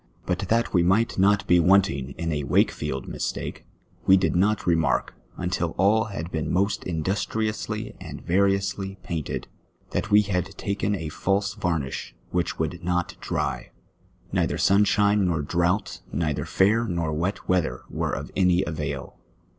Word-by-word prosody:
l>ut - - -1
that 115 +1 +1
we 90 - +4
nii^ht 95 +5 +2
not 100 +1 +4
be 90 - +5
wantinj^ 85 -7 +3
in 85 0 -2
a 75 -1 -1
Wakefield 65 -1 0
mistake, - - -4 0.4
we 95 - +8
did 95 - +1
not 100 +4 +2
remark, 85 -2 +1 0.2
imtil 90 -2 -2
all 105 +4 +4
had 90 -5 -6
been 80 -2 -2
most 100 +3 +1
industriously 100 +6 -2
and - - -8
variously 95 +1 +1
painted, 80 -4 -4 0.4
that - - -2
we 105 0 +6
had 95 -1 -2
taken 100 +1 -1
a 80 -5 -4
false 100 +5 0
varnish 80 -9 -3 0.2
whieh 90 -2 0
would 80 +2 -3
not 90 0 -1
dry; - - -2 0.6
neither - - 0
sunshine 100 0 +3
nor 80 -4 0
drauf^ht, 85 +6 0
ncitlier 75 -4 -1
fair 110 +5 +3
nor 85 -4 -1
wet 90 +6 -2
weather 80 -9 +1
were - - -2
of - - -5
any 90 -1 +3
avail. 80 -4 -5
90 Hz, 145 wpm, -25 LUFS, 85-100 Hz, 0.6 s, we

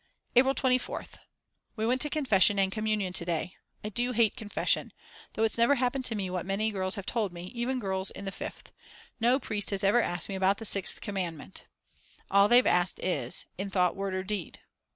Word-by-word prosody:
April 265 +2 +5
24th. 255 -2 -1 0.6
We 220 -1 -2
went 250 +3 +1
to 295 - +2
confession 210 -10 +3
and 195 -1 +2
communion 215 -3 -1
to 175 - 0
day. 170 +1 -2 0.3
I 210 - -3
do 245 +4 -2
hate 225 -2 +2
confession; 210 -1 -1 0.4
though 220 - -1
it's 225 +1 0
never 235 +5 +5
happened 255 +1 -1
to 230 - +1
me 195 -3 -2
what 180 -1 -2
many 200 +3 -1
girls 185 -1 -1
have 200 -3 -6
told 215 -5 -1
me, 175 +1 -9
even 245 +2 -2
girls 190 -3 -1
in 200 - -9
the 195 - -3
Fifth. - - -8 0.5
No 245 +3 +3
priest 210 -5 -3
has 200 -1 -2
ever 205 +5 +4
asked 175 -4 -2
me - - -5
about 190 +1 +2
the 225 - -6
6th 195 -2 +4
commandment; 175 - -5 0.7
all 200 +1 +6
they've 245 +1 +6
asked 180 +1 +1
is: 140 -9 +1
In 200 +1 -3
thought, 180 -2 +1
word, 195 -1 -3
or 185 - -2
deed? 195 -3 -3
200 Hz, 200 wpm, -29 LUFS, 190-235 Hz, 0.7 s, all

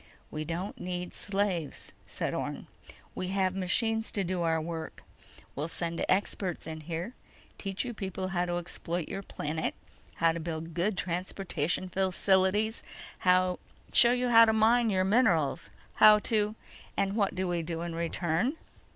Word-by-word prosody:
"We 155 0 -4
don't 170 +5 -4
need 180 0 -4
slaves," 195 -6 -2 0.2
said - - -3
Orne. - - -4 0.5
"We 185 - -4
have 190 -1 +1
machines 220 +4 +1
to 200 - 0
do 180 0 -2
our 165 -1 +2
work. 160 0 -6 0.5
We'll 150 +3 -2
send 170 0 -3
experts 190 -1 0
in 160 0 -6
here, 170 +8 -5 0.5
teach 195 +3 -3
you 240 - -4
people 190 -3 -4
how 180 -2 0
to 175 0 -2
exploit 175 -1 -3
your 195 - -4
planet, 160 -4 -3 0.4
how 165 0 +3
to 165 - -4
build 165 0 -5
good 180 +4 0
transportation 180 -1 -1
facilities, 190 +3 +2 0.4
show 185 0 +3 0.5
you 250 0 +1
how 230 -1 +8
to 220 - +2
mine 225 +2 +4
your 190 -2 +2
minerals, 185 - +2 0.2
how 215 0 +8
to—" 210 0 +1 0.4
"And 195 0 0
what 200 -4 +1
do 185 0 -1
we 175 -1 0
do 165 0 -4
in 170 -1 -4
return?" 170 - -1
185 Hz, 150 wpm, -30 LUFS, 170-205 Hz, 0.5 s, how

